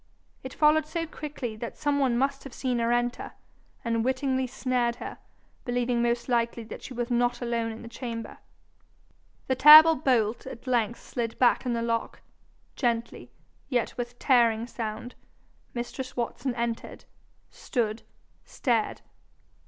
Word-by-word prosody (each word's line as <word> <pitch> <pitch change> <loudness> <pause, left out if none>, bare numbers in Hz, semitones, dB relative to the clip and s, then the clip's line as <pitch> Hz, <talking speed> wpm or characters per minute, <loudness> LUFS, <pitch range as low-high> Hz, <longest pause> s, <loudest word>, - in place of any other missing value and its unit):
It 260 - -6
followed 305 0 +4
so 330 +1 -2
quickly, 290 -7 -6
that 235 +1 -6
some 290 -1 0
one 255 -4 +2
must 275 +2 0
have 275 - -10
seen 250 -3 -1
her 230 0 +1
enter, 240 +1 -1 0.5
and 230 -1 0
wittingly 260 0 0
snared 250 -2 0
her, 245 - -8 0.4
believing 245 -1 0
most 235 0 0
likely 235 -1 0
that 220 - -9
she 255 - -9
was 240 +1 -3
not 240 0 +1
alone 235 -2 -1
in 225 - -9
the - - -8
chamber. 230 -1 -6 1.1
The 260 - +1
terrible 310 +4 +10
bolt 240 -4 +1
at 260 -2 -9
length 235 -3 0
slid 230 -2 -4
back 250 0 +3
in 245 - +1
the 230 0 -1
lock, 230 -1 -2 0.5
gently, 235 -2 -2 0.4
yet 245 -4 0
with 245 0 -5
tearing 235 -4 +3
sound; 235 0 -5 0.6
mistress 250 +2 -5
Watson 240 +1 -2
entered, 235 -1 -4 0.5
stood, 225 -3 -2 0.4
stared. 230 -4 -1
240 Hz, 145 wpm, -27 LUFS, 235-260 Hz, 1.1 s, terrible